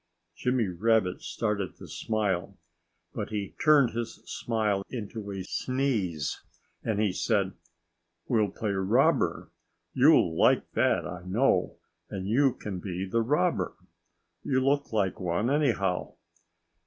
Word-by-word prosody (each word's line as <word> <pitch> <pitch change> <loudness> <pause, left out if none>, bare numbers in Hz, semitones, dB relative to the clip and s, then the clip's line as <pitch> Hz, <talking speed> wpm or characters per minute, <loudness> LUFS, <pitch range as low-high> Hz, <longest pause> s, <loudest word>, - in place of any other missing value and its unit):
Jimmy 125 +1 +1
Rabbit 95 +1 +1
started 105 -4 -2
to - - -11
smile. 100 -3 -2 0.6
But 105 - -4
he 105 -2 -4
turned 150 -5 +6
his 115 0 -4
smile 110 -4 -1
into 110 -3 -6
a 95 -1 -4
sneeze. 105 - -1 0.4
And 110 -3 -1
he 105 -3 +2
said 100 -2 0 0.7
"We'll 110 -4 +2
play 105 +2 -3
robber. 95 -1 +2 0.4
You'll 80 - +5
like - - +3
that, - - +2
I 90 0 -6
know. 95 -2 +2 0.3
And 95 -1 -5
you 130 +4 +3
can 95 -3 -5
be 90 0 -4
the 115 +5 0
robber. 150 +9 +1 0.7
You 130 -2 +1
look 140 +1 +1
like 100 -5 0
one, 90 +7 0
anyhow." 115 -11 0
105 Hz, 125 wpm, -28 LUFS, 95-120 Hz, 0.7 s, turned